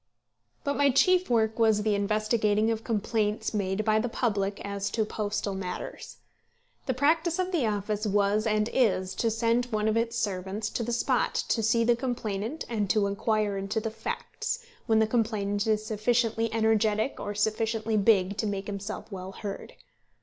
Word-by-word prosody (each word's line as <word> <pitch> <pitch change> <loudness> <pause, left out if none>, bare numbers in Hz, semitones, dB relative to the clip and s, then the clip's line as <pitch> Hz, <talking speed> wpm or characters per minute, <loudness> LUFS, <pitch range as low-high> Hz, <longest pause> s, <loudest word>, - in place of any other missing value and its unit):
But 285 - -1
my 285 0 +4
chief 365 +7 +3
work 225 -1 +1
was 220 -2 +4
the 215 -1 +2
investigating 215 +1 +1
of 225 0 -3
complaints 215 -1 -1
made 200 0 -1
by 215 0 +3
the 240 +2 -1
public 205 -4 -1
as 200 0 -3
to 220 -2 0
postal 210 -1 -2
matters. 185 -2 -6 0.7
The 260 - 0
practice 320 +5 +2
of 370 0 -1
the 305 -10 +1
office 210 +1 -1
was 205 +2 +2
and 215 0 +2
is 185 -7 +2
to 230 - 0
send 230 +2 +1
one 215 -3 -1
of 220 - +2
its 230 +1 0
servants 200 0 -2
to - - -2
the 235 +1 -2
spot 235 - +1
to 225 - +2
see 230 +2 +3
the 235 +1 +4
complainant 235 +1 -3
and 210 -4 -1
to 210 -1 +3
inquire 205 0 0
into 195 +3 -2
the 220 0 -3
facts, 470 - -4 0.2
when 220 -2 +4
the 220 - +5
complainant 215 -2 0
is 215 -1 +1
sufficiently 225 +1 +1
energetic 220 +1 +1
or 205 0 -4
sufficiently 220 +1 0
big 200 -2 +3
to 215 - -1
make 200 -1 -3
himself 205 +2 -6
well 190 0 -6
heard. 200 0 -7
215 Hz, 170 wpm, -28 LUFS, 205-230 Hz, 0.7 s, the